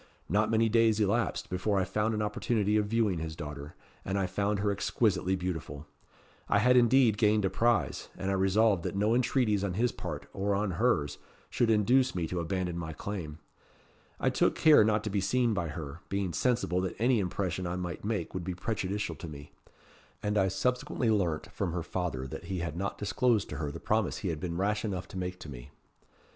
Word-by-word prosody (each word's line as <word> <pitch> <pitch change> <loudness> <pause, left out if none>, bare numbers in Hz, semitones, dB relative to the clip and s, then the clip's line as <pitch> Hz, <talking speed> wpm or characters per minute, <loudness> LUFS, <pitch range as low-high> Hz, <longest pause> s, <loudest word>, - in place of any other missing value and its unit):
Not 105 +5 +2
many 115 0 +3
days 110 -1 +3
elapsed 105 -4 0
before 95 +3 0
I - - +2
found 105 +4 0
an 105 - -1
opportunity 105 0 0
of 105 -1 +2
viewing 105 -5 +1
his 80 0 -5
daughter, 75 -1 -7 0.3
and 95 +1 -2
I 95 - +1
found 100 +3 0
her 100 +1 +1
exquisitely 95 -2 +1
beautiful. 80 -5 -4 0.6
I - - +4
had 125 +5 +4
indeed 120 -3 +5
gained 105 -2 +3
a 95 - 0
prize; 115 +2 +1
and 95 +1 -2
I - - +1
resolved 95 +1 +3
that - - -4
no 105 +3 +2
entreaties 120 -4 +2
on 95 -3 -2
his 120 +3 +2
part, - - -6
or 100 +1 0
on 100 0 0
hers, 80 -13 +1 0.3
should 120 - +1
induce 125 +5 +3
me 85 -2 -1
to 90 - -2
abandon 90 0 -2
my 80 -1 -5
claim. 80 -4 -5 0.8
I - - +2
took - - +2
care 155 -7 +7
not 105 0 +2
to 105 - -3
be 100 -1 0
seen 120 +4 +2
by 95 -5 -1
her, 75 0 -6
being 95 -2 -1
sensible 115 -4 +1
that 95 - -3
any 120 +1 +3
impression 90 -1 -2
I 85 - -2
might 90 -1 -5
make 105 -5 -2
would 90 - -3
be 90 0 -4
prejudicial 100 +1 -2
to 85 - -7
me; 75 -2 -10 0.7
and 105 0 0
I 95 -2 +3
subsequently 125 +3 0
learnt 90 -7 0
from 90 -4 -2
her 85 -2 -2
father 85 -7 -3
that 65 - -7
he 95 - -3
had 85 -2 -3
not 100 +3 -3
disclosed 110 +1 +1
to - - -5
her 75 -3 -2
the - - -7
promise 110 -2 0
he 95 - -3
had 80 -2 -3
been 85 0 -3
rash 105 +3 0
enough 95 -5 -3
to - - -8
make 90 0 -4
to 75 - -8
me. - - -9
100 Hz, 205 wpm, -30 LUFS, 90-110 Hz, 0.8 s, care